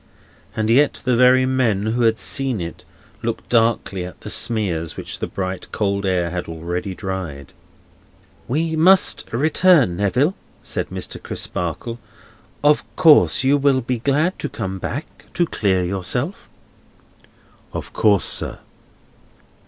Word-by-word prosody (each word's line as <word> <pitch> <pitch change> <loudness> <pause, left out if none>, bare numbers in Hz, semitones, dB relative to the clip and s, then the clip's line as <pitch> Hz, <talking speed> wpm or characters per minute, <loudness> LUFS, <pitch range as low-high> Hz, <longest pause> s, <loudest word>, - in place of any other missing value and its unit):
And 110 0 0
yet 140 +5 +3
the 125 -2 +3
very 125 +1 +5
men 120 -6 +1
who 115 +3 0
had 115 -1 +3
seen 135 -3 -1
it 85 -1 -7 0.4
looked - - -4
darkly 115 -5 +1
at 90 - -10
the - - -5
smears 90 -8 -1
which - - -6
the - - -3
bright 95 -1 -5
cold 100 -1 -1
air 90 -2 0
had 90 -2 -4
already 85 +4 -4
dried. 90 -9 -6 0.9
"We 160 +5 -1
must 180 +4 +4
return, 150 - +3
Neville," 125 - +1 0.3
said - - -3
Mr. - - -5
Crisparkle; 105 +8 -4 0.6
"of 150 0 +4
course 160 -6 +5
you 140 +2 +4
will 140 -2 +2
be 125 0 -2
glad 150 +9 +1
to - - -3
come 95 0 -5
back 145 +10 -7
to 175 - +2
clear 95 - 0
yourself?" 120 - -2 1.2
"Of - - -7
course, - - +3
sir." - - 0
115 Hz, 135 wpm, -20 LUFS, 95-140 Hz, 1.2 s, very